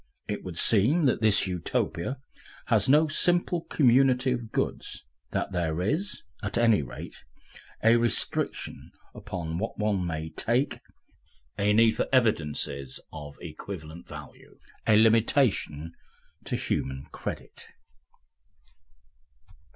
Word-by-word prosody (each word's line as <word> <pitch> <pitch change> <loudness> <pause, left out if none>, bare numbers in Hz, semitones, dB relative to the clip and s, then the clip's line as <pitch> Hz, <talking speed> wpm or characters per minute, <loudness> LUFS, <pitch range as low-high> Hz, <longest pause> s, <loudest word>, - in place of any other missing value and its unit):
It - - -4
would 90 -3 -7
seem 120 - +4
that 130 - +2
this 110 -2 +5
Utopia 90 - -2 0.5
has 115 -1 +2
no 150 +3 +6
simple 175 +2 +1
community 130 -1 +4
of 120 -3 -3
goods, - - -3 0.2
that - - -2
there 85 -3 -1
is, 155 - -2 0.2
at 100 +2 -3
any 115 -7 +4
rate, 65 - -9 0.6
a 115 +1 +6
restriction 120 -1 -1 0.2
upon 90 -6 -5
what 115 - -4
one 105 -4 0
may 80 -1 -3
take, 120 - 0 0.8
a 100 +1 +3
need 110 +1 +4
for - - 0
evidences 75 - 0
of 75 -2 -8
equivalent 85 0 -8
value, - - -11 0.3
a 110 - +6
limitation 110 - +2 0.5
to - - -2
human 65 +1 -2
credit. - - -7
105 Hz, 110 wpm, -27 LUFS, 85-125 Hz, 0.8 s, no